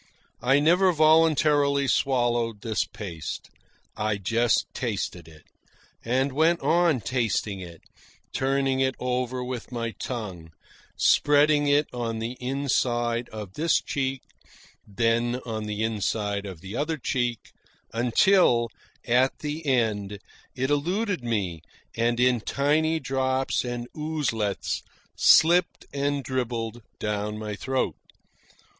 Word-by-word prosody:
I 135 +4 +4
never 180 +5 +4
voluntarily 155 -3 +4
swallowed 120 -5 +1
this 110 -1 -1
paste. 85 -7 -7 0.4
I 105 -1 -1
just 115 +4 +1
tasted 100 -7 -3
it, 80 -2 -16 0.6
and 130 +4 +1
went 160 +5 +3
on 165 -6 +3
tasting 110 -3 -1
it, 85 -3 -10 0.5
turning 135 0 +1
it 130 0 +1
over 125 0 -2
with 125 -1 -6
my 115 -2 -3
tongue, 95 -11 -6 0.4
spreading 145 0 +4
it 145 +1 +4
on 115 -2 -3
the 115 +1 -3
inside 125 -3 0
of 105 -4 -8
this 160 +7 +2
cheek, 135 -1 -3 0.6
then 115 +3 +1
on 110 -2 -4
the 105 +1 -2
inside 105 -2 -1
of 90 -5 -9
the 95 +4 -7
other 155 +4 -1
cheek, 120 -4 -2 0.4
until, 120 - +3 0.4
at 125 +2 +2
the 150 +2 -4
end, 105 -6 0 0.4
it 130 +3 -1
eluded 180 - 0
me 100 -9 -2 0.3
and 120 +1 +1
in 125 -2 +3
tiny 155 +6 +1
drops 130 -1 0
and 120 -1 -4
oozelets, 145 -10 -2 0.3
slipped 170 +3 +4
and 140 0 -1
dribbled 120 -3 -3 0.2
down 105 0 -2
my 105 -1 -5
throat. 130 +5 -1
125 Hz, 115 wpm, -26 LUFS, 110-140 Hz, 0.6 s, I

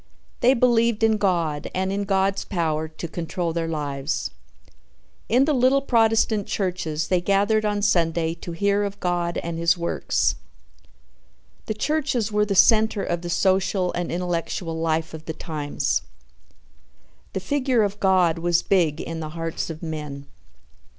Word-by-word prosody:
They 255 +3 +4
believed 235 -2 +2
in 220 -1 +4
God 170 -7 0
and 190 +1 0
in 200 0 -1
God's 195 0 +1
power 160 -4 -1
to 155 +2 -7
control 170 +1 -3
their 165 0 -1
lives. 145 -2 -3 1.0
In 250 +4 +4
the 305 - +1
little 260 +1 +4
Protestant 225 -4 +2
churches 170 -5 -2
they 180 -2 +2
gathered 205 +3 +2
on 205 -1 0
Sunday 165 -4 +2
to 170 0 -8
hear 200 +4 +1
of 200 0 -4
God 175 -1 -1
and 165 -1 -4
his 170 +2 +3
works. 170 0 0 1.3
The 215 - -2
churches 260 -3 0
were 210 0 +2
the 200 - -1
center 220 0 +4
of 175 -1 -2
the 175 - -5
social 185 0 +1
and 175 -1 -3
intellectual 170 -1 -2
life 160 0 -1
of 160 0 -9
the 160 - -4
times. 150 -3 -2 1.3
The - - -1
figure 255 +2 +1
of 205 0 -2
God 185 -4 +3
was 175 0 +1
big 170 -6 +2
in 165 - -5
the 155 -1 -5
hearts 165 0 -3
of 160 +1 -7
men. 150 -3 -5
180 Hz, 150 wpm, -23 LUFS, 165-210 Hz, 1.3 s, They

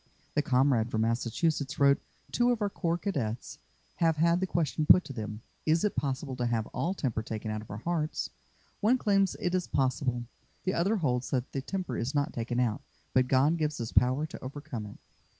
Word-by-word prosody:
The - - +3
comrade 130 -5 +3
from 110 -2 0
Massachusetts 125 +6 0
wrote: 140 0 +5 0.3
"Two 240 0 +3
of 240 - 0
our 205 -2 0
Corps 170 -3 0
Cadets 130 - -3 0.4
have 165 -2 +3
had 170 +2 +4
the 190 - 0
question 155 -3 0
put 180 - +8
to 135 - -8
them: 110 -1 -6 0.2
'Is 160 +1 +2
it 210 - +1
possible 135 -1 -2
to 120 -1 0
have 115 -2 0
all 185 +3 -1
temper 120 - -1
taken 110 0 -4
out 110 0 -3
of 110 - -13
our 105 - -5
hearts?' 155 +5 -2 0.5
One 230 +5 +4
claims 195 -5 +2
it 175 - -1
is 185 -1 0
possible. 130 -2 0 0.4
The 185 - 0
other 190 +6 +2
holds 125 -8 0
that 130 -2 -1
the 135 - -2
temper 185 +6 -3
is 130 +6 -2
not 145 0 +1
taken 120 +1 -2
out, 120 +1 +1 0.3
but 130 -1 +4
God 140 +6 +3
gives 155 -3 -1
power 130 +5 +3
to 155 - -9
overcome 130 -5 -6
it." 105 - -11
140 Hz, 200 wpm, -30 LUFS, 120-170 Hz, 0.5 s, put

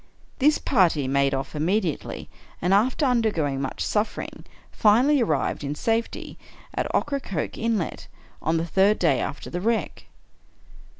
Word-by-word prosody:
This 295 +3 +4
party 170 - +2
made 140 +1 +2
off 135 +3 -5
immediately, 170 +2 -1 0.3
and, 180 +3 +1
after 250 +8 +3
undergoing 205 - +1
much 135 - -3
suffering, 210 +1 -2 0.3
finally 250 +7 +4
arrived, 155 - 0
in 145 +1 -3
safety, 225 +5 -2 0.3
at - - -1
Ocracoke 275 - -2
Inlet, 220 -7 -2 0.3
on 160 +1 +1
the 165 - -1
third 195 +5 +3
day 150 -7 +2
after 150 - -5
the 175 - -3
wreck. 230 +2 -1
190 Hz, 130 wpm, -25 LUFS, 150-230 Hz, 0.3 s, This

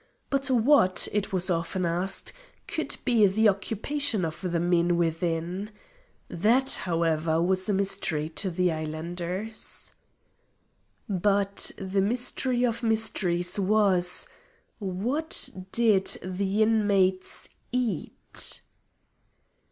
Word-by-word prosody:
But 275 0 0
what, 245 -5 +4
it 205 -1 -1
was 185 0 0
often 175 +2 -1
asked, 175 +3 -1 0.3
could - - -2
be 230 -5 +5
the 215 +4 +3
occupation 220 - -1
of 160 0 -6
the 175 -3 -1
men 175 0 +2
within? 170 +3 -1 0.6
That, 230 +10 +2
however, 165 -2 0
was 185 +3 +1
a - - +2
mystery 190 -6 0
to 190 +4 -2
the 180 0 +1
islanders. 170 +7 -5 1.2
But 200 0 0
the 195 0 -1
mystery 245 +3 0
of 230 -2 -1
mysteries 195 -5 0
was: 195 -3 +2 0.5
What 230 - 0 0.2
did 215 -5 +3
the 195 +3 0
inmates 200 -4 +1 0.2
eat? 240 -8 -2
190 Hz, 100 wpm, -27 LUFS, 175-220 Hz, 1.2 s, be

